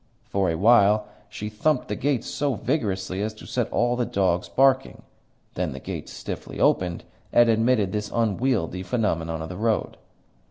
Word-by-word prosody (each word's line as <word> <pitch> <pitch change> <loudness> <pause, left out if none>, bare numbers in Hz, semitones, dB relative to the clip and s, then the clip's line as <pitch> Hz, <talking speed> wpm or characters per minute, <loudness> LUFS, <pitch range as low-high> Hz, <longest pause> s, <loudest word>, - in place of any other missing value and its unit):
For 100 -2 0
a 80 - 0
while 105 +1 +5 0.2
she 105 - -6
thumped 125 +7 0
the 105 - -2
gates 135 0 0
so 145 -3 -1
vigorously 100 -7 -2
as 110 +1 -3
to - - -12
set 120 -2 -2
all 120 +1 +2
the 125 - 0
dogs 95 -5 0
barking; 135 0 +2 0.5
then - - -2
the - - -7
gates - - -6
stiffly - - -7
opened, 90 -2 +2 0.3
and 120 0 +5
admitted 110 -3 +2
this 105 0 -3
unwieldy 115 -5 0
phenomenon 85 -7 -1
of 80 - -7
the 90 - -6
road. 110 +1 0
110 Hz, 165 wpm, -25 LUFS, 95-120 Hz, 0.5 s, while